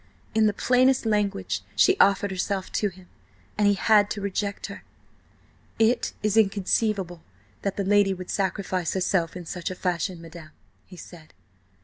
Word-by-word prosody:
In 220 Hz, -1 st, +4 dB
the -, -, +3 dB
plainest 255 Hz, +4 st, +2 dB
language 210 Hz, -2 st, -1 dB
she 385 Hz, -, +5 dB
offered 200 Hz, 0 st, +4 dB
herself 190 Hz, +1 st, -3 dB
to 205 Hz, -, 0 dB
him, 185 Hz, -1 st, -17 dB, 0.5 s
and 210 Hz, 0 st, +2 dB
he 205 Hz, -, +4 dB
had 210 Hz, 0 st, +4 dB
to 210 Hz, -, -4 dB
reject 200 Hz, +1 st, -3 dB
her. -, -, -9 dB, 0.9 s
"It 225 Hz, +2 st, +2 dB
is 210 Hz, -1 st, +1 dB
inconceivable 200 Hz, -3 st, +1 dB, 0.4 s
that 200 Hz, -, -3 dB
the 200 Hz, -, 0 dB
lady 205 Hz, 0 st, +4 dB
would 185 Hz, 0 st, -7 dB
sacrifice 190 Hz, -3 st, -1 dB
herself 180 Hz, -2 st, 0 dB
in 175 Hz, -, -8 dB
such 180 Hz, +3 st, -4 dB
a 185 Hz, -, -5 dB
fashion, 180 Hz, -1 st, -2 dB
madam," 165 Hz, -1 st, -12 dB, 0.3 s
he 180 Hz, -, -13 dB
said. 165 Hz, -2 st, -13 dB
195 Hz, 155 wpm, -25 LUFS, 180-210 Hz, 0.9 s, she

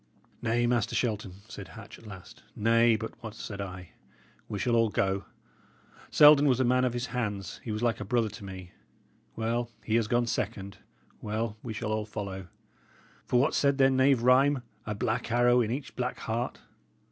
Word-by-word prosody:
"Nay, 120 Hz, +1 st, +1 dB
Master 120 Hz, -3 st, +1 dB
Shelton," 100 Hz, -5 st, -2 dB
said -, -, -9 dB
Hatch, -, -, -11 dB
at 115 Hz, -, -14 dB
last 95 Hz, -4 st, -11 dB
"nay, 115 Hz, +1 st, +4 dB
but 110 Hz, +1 st, -5 dB
what 110 Hz, -2 st, -7 dB
said 100 Hz, -2 st, -6 dB
I? 90 Hz, -2 st, -7 dB, 0.6 s
We 105 Hz, -, -3 dB
shall 120 Hz, +4 st, +1 dB
all 115 Hz, -1 st, +3 dB
go. 95 Hz, 0 st, 0 dB, 0.8 s
Selden 150 Hz, -1 st, +7 dB
was 130 Hz, -2 st, +3 dB
a -, -, +4 dB
man 125 Hz, +1 st, +3 dB
of 125 Hz, -, 0 dB
his 120 Hz, 0 st, -2 dB
hands; 105 Hz, -6 st, -3 dB
he 115 Hz, -, -4 dB
was 110 Hz, +2 st, -3 dB
like 120 Hz, -2 st, +1 dB
a -, -, -3 dB
brother 115 Hz, +2 st, +1 dB
to 105 Hz, -, -11 dB
me. 95 Hz, -2 st, -8 dB, 0.6 s
Well, 115 Hz, +1 st, -1 dB, 0.2 s
he 110 Hz, +1 st, +2 dB
has 115 Hz, -2 st, +1 dB
gone 120 Hz, +2 st, +2 dB
second; 100 Hz, -4 st, -3 dB, 0.4 s
well, 110 Hz, 0 st, -2 dB
we 115 Hz, -, -5 dB
shall 110 Hz, 0 st, -3 dB
all 110 Hz, 0 st, -1 dB
follow! 100 Hz, -3 st, -6 dB, 0.8 s
For 125 Hz, -, +3 dB
what 135 Hz, -, +2 dB
said 140 Hz, -1 st, +2 dB
their 135 Hz, -1 st, +5 dB
knave 130 Hz, -2 st, +3 dB
rhyme? 130 Hz, +1 st, +4 dB, 0.2 s
'A 105 Hz, -, -2 dB
black 110 Hz, +1 st, -2 dB
arrow 120 Hz, +1 st, +4 dB
in 110 Hz, -, -1 dB
each 130 Hz, +3 st, -4 dB
black 125 Hz, 0 st, -2 dB
heart.' 115 Hz, +2 st, -2 dB
115 Hz, 185 wpm, -29 LUFS, 105-125 Hz, 0.8 s, Selden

